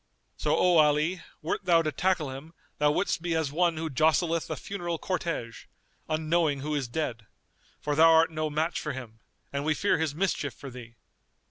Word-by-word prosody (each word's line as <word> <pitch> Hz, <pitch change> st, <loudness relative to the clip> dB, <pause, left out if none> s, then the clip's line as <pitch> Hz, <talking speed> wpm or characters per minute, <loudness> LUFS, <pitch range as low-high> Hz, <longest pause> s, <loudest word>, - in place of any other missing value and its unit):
So -, -, 0 dB
O 180 Hz, -2 st, +4 dB
Ali, 155 Hz, +4 st, +3 dB, 0.2 s
wert 155 Hz, -, -2 dB
thou 170 Hz, -2 st, +4 dB
to 155 Hz, -, -1 dB
tackle 180 Hz, -5 st, 0 dB
him, 150 Hz, +5 st, -10 dB, 0.2 s
thou 150 Hz, 0 st, +4 dB
wouldst 165 Hz, +3 st, 0 dB
be 170 Hz, -1 st, -1 dB
as 160 Hz, -4 st, 0 dB
one 170 Hz, +1 st, +1 dB
who 160 Hz, +1 st, -2 dB
jostleth 160 Hz, +3 st, +1 dB
a -, -, -2 dB
funeral 175 Hz, -4 st, -4 dB
cortège, 165 Hz, -10 st, -3 dB, 0.4 s
unknowing 155 Hz, -2 st, +1 dB
who 150 Hz, +2 st, -3 dB
is 140 Hz, -4 st, -1 dB
dead;[FN#243] 120 Hz, -4 st, -3 dB, 0.6 s
for 150 Hz, -, 0 dB
thou 165 Hz, +2 st, +7 dB
art 160 Hz, 0 st, +5 dB
no 155 Hz, -1 st, -2 dB
match 155 Hz, +3 st, -1 dB
for 150 Hz, -, -4 dB
him, 115 Hz, -4 st, -9 dB, 0.3 s
and 140 Hz, 0 st, -1 dB
we 155 Hz, 0 st, +1 dB
fear 200 Hz, +3 st, +1 dB
his 160 Hz, -3 st, -1 dB
mischief 155 Hz, -, -1 dB
for 135 Hz, +5 st, -9 dB
thee. 120 Hz, -2 st, -11 dB
155 Hz, 190 wpm, -28 LUFS, 145-170 Hz, 0.6 s, thou